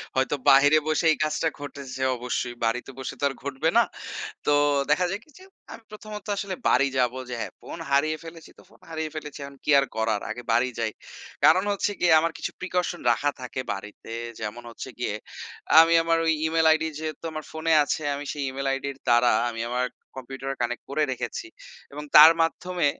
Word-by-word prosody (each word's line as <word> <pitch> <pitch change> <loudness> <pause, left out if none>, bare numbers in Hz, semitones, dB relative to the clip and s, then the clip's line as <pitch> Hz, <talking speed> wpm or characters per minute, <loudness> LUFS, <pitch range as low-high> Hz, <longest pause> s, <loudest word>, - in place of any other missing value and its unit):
হয়তো 130 +2 +1
বাহিরে 145 +3 +7
বসে 155 +1 +1
এই - - +1
কাজটা 155 +1 0
ঘটেছে 140 -2 -7
অবশ্যই, 125 0 -3
বাড়িতে 125 +4 -1
বসে 130 - -5
তো - - -7
আর - - -6
ঘটবে 140 +3 -1
না। 235 - +7 0.6
তো 150 - +2 0.4
দেখা 165 +5 +3
যায় 195 - -3
কি? - - -27
যে, 375 - -15 0.3
আমি 230 - -10
প্রথমত 215 -1 -9
আসলে 195 -1 -3
বাড়ি 140 +2 +4
যাবো 125 0 +1
যে, - - -4
হ্যাঁ, - - -5
ফোন - - -8
হারিয়ে 155 +3 +2
ফেলেছি, 165 0 -11
তো - - -16
ফোন - - -22
হারিয়ে 160 -1 -3
ফেলেছি। 150 -2 -7
এখন 140 0 -12
কি - - +2
আর 140 - +1
করার? 110 -2 0
আগে 115 +3 -5
বাড়ি 120 +2 +3
যাই। 115 -1 0 0.5
কারণ 165 +5 +6
হচ্ছে 200 +1 -1
গিয়ে, 175 - +3
আমার 165 +1 0
কিছু - - -4
প্রিকশন 180 -1 -2
রাখা 145 +5 +1
থাকে 125 0 -5
বাড়িতে। 105 +2 -10 0.3
যেমন 115 +3 -5
হচ্ছে 115 - -8
গিয়ে 120 - -1 0.7
আমি 165 +1 +6
আমার, 165 0 +2
ঐ - - 0 0.2
ইমেইল 160 0 +2
আইডি 160 0 +2
যেহেতু 155 -1 -6
আমার 155 -1 -6
ফোনে 160 +1 -1
আছে, 145 - -2
আমি 145 +1 -6
সেই 145 - -4
ইমেইল 135 +1 -4
আইডির 135 0 -4
দ্বারা, 120 +1 +5 0.2
আমি 115 -1 -5
আমার 125 +1 0 0.3
কম্পিউটারে 135 +1 -6
কানেক্ট 120 0 -2
করে 150 +2 +1
রেখেছি। 125 - -4 0.5
এবং 150 +1 -6
তার 155 +2 +11
মাধ্যমে 175 +1 -1
145 Hz, 195 wpm, -25 LUFS, 125-160 Hz, 0.7 s, তার